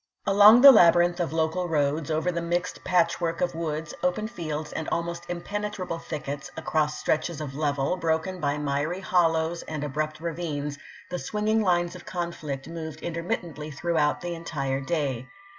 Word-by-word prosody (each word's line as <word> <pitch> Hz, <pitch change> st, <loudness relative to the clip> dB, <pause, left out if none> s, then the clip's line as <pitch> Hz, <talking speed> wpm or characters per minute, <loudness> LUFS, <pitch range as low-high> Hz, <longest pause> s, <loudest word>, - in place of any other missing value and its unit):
Along 205 Hz, +4 st, +8 dB
the 275 Hz, +1 st, +12 dB
labyrinth 175 Hz, -4 st, +5 dB
of 175 Hz, -, 0 dB
the -, -, -6 dB
local 165 Hz, +3 st, 0 dB
roads, 150 Hz, 0 st, 0 dB
over 160 Hz, +3 st, 0 dB
the 170 Hz, -1 st, -2 dB
mixed 175 Hz, +2 st, -2 dB
patchwork 170 Hz, -2 st, +1 dB
of 180 Hz, -, 0 dB
woods, 160 Hz, -1 st, -3 dB
open 180 Hz, +4 st, 0 dB
fields, 155 Hz, -7 st, -5 dB
and 160 Hz, -, -3 dB
almost 170 Hz, 0 st, -3 dB
impenetrable 185 Hz, 0 st, -4 dB
thickets, 145 Hz, -3 st, -5 dB
across 150 Hz, -1 st, 0 dB
stretches 155 Hz, +1 st, -1 dB
of 150 Hz, -3 st, -5 dB
level, 145 Hz, +1 st, 0 dB
broken 165 Hz, +2 st, -1 dB
by 145 Hz, -2 st, 0 dB
miry 150 Hz, +5 st, -1 dB
hollows 165 Hz, -2 st, +1 dB
and 155 Hz, -2 st, -5 dB
abrupt 155 Hz, +2 st, -3 dB
ravines, 155 Hz, -4 st, -4 dB, 0.3 s
the 180 Hz, -, -2 dB
swinging 215 Hz, +2 st, 0 dB
lines 175 Hz, -3 st, +1 dB
of 180 Hz, -, -10 dB
conflict 160 Hz, -6 st, -4 dB
moved 160 Hz, -2 st, -7 dB
intermittently 170 Hz, -3 st, -4 dB
throughout 155 Hz, 0 st, 0 dB
the 175 Hz, -1 st, -3 dB
entire 140 Hz, -5 st, -3 dB
day. 135 Hz, -4 st, -2 dB
165 Hz, 160 wpm, -26 LUFS, 150-175 Hz, 0.3 s, the